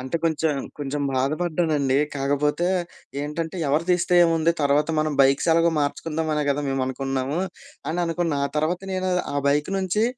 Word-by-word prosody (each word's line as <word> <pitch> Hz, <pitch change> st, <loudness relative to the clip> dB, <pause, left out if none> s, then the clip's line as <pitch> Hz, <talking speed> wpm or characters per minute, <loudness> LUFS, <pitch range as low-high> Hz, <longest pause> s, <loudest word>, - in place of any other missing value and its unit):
అంటే 130 Hz, +6 st, -2 dB
కొంచెం, 160 Hz, -1 st, +1 dB, 0.3 s
కొంచెం 145 Hz, 0 st, -3 dB
బాధపడ్డానండి. 150 Hz, -1 st, +1 dB, 0.2 s
కాకపోతే 145 Hz, +5 st, 0 dB, 0.5 s
ఏంటంటే, 160 Hz, +4 st, -4 dB
ఎవరు 150 Hz, +4 st, +1 dB
తీస్తే 180 Hz, 0 st, +2 dB
ఏముంది, 165 Hz, 0 st, +2 dB
తర్వాత 145 Hz, +2 st, +2 dB
మనం 155 Hz, -1 st, 0 dB
బైక్స్ 135 Hz, +4 st, +3 dB
ఎలాగో 165 Hz, +1 st, +4 dB
మార్చుకుందాం 160 Hz, +2 st, -2 dB
అనే 150 Hz, -, 0 dB
గదా 145 Hz, +1 st, 0 dB
మేము 135 Hz, -1 st, 0 dB
అనుకున్నాము 135 Hz, +2 st, -2 dB, 0.5 s
అని 175 Hz, -, -1 dB
అనుకున్నా. 165 Hz, -3 st, -1 dB
ఆ -, -, -6 dB
తర్వాత 160 Hz, +4 st, 0 dB
నేను 185 Hz, 0 st, -1 dB, 0.2 s
ఆ -, -, 0 dB
బైక్ 150 Hz, +5 st, +1 dB
నుంచి 190 Hz, +4 st, +1 dB
150 Hz, 155 wpm, -24 LUFS, 140-170 Hz, 0.5 s, ఎలాగో